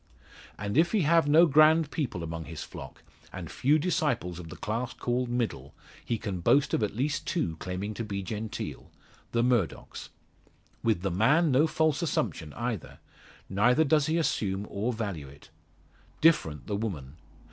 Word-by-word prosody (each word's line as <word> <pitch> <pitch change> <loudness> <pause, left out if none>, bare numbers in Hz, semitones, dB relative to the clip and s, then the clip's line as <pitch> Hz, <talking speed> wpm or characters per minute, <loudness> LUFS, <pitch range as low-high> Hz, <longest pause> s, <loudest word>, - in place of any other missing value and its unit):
And 100 +7 0
if 170 +5 +3
he 215 - +3
have 165 0 +4
no 160 +4 +7
grand 155 0 +5
people 115 - -3
among 80 0 -5
his 80 - -7
flock, - - -10 0.3
and - - -7
few 145 +4 +3
disciples 145 - -1
of 85 -2 -9
the - - -8
class 115 +4 -3
called 125 0 -1
middle, 115 - -3 0.3
he 115 - -1
can 100 -4 -4
boast 140 +11 +3
of - - +2
at 105 -1 -1
least 145 +6 -1
two 85 - -1
claiming 95 +5 -4
to 115 - -4
be 100 -2 -4
genteel 105 - -5 0.4
the 115 0 +2
Murdocks. 120 -7 -1 0.7
With 110 -6 +1
the 95 - 0
man 145 - +3
no 140 +5 +4
false 155 -2 +1
assumption 80 - -2
either; 120 -6 -4 0.5
neither 125 +10 +3
does 150 -1 +3
he 160 +2 +1
assume, 100 - 0
or 105 +5 -1
value 100 - -4
it. 70 +3 -16 0.7
Different 115 - +3
the 105 - -2
woman. 80 -10 -5
115 Hz, 165 wpm, -28 LUFS, 95-150 Hz, 0.7 s, no